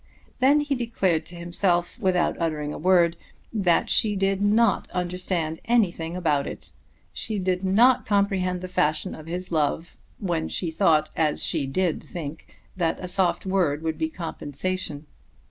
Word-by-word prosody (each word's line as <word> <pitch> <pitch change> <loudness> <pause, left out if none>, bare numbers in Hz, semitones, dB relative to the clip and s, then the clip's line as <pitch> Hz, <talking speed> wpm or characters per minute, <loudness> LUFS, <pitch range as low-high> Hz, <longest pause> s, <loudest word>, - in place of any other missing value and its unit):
Then 280 +3 +5
he 290 -1 -1
declared 195 - 0
to 175 - -8
himself, 175 +1 0
without 180 -2 +1
uttering 150 -2 -1
a - - -6
word, 175 -1 +4 0.4
that 185 -6 +2
she 210 -2 +3
did 195 0 0
not 210 +1 +3
understand 180 -2 -2
anything 180 -8 +1
about 150 -6 +1
it; - - -8 0.4
she 215 - -3
did 185 -1 -1
not 230 +7 +4
comprehend 195 -3 +1
the 185 - -5
fashion 180 0 0
of 155 - -10
his 180 +2 -5
love 160 +2 -1 0.2
when 170 -5 -2
she 170 -3 -2
thought, 160 -3 +2
as 155 -2 +1
she 140 - 0
did 175 +4 0
think, 160 -2 -8 0.2
that 170 -3 0
a 180 - -5
soft 180 0 +1
word 175 -6 +1
would 160 -1 -2
be 160 0 0
compensation. 160 -1 -4
180 Hz, 155 wpm, -25 LUFS, 160-195 Hz, 0.4 s, Then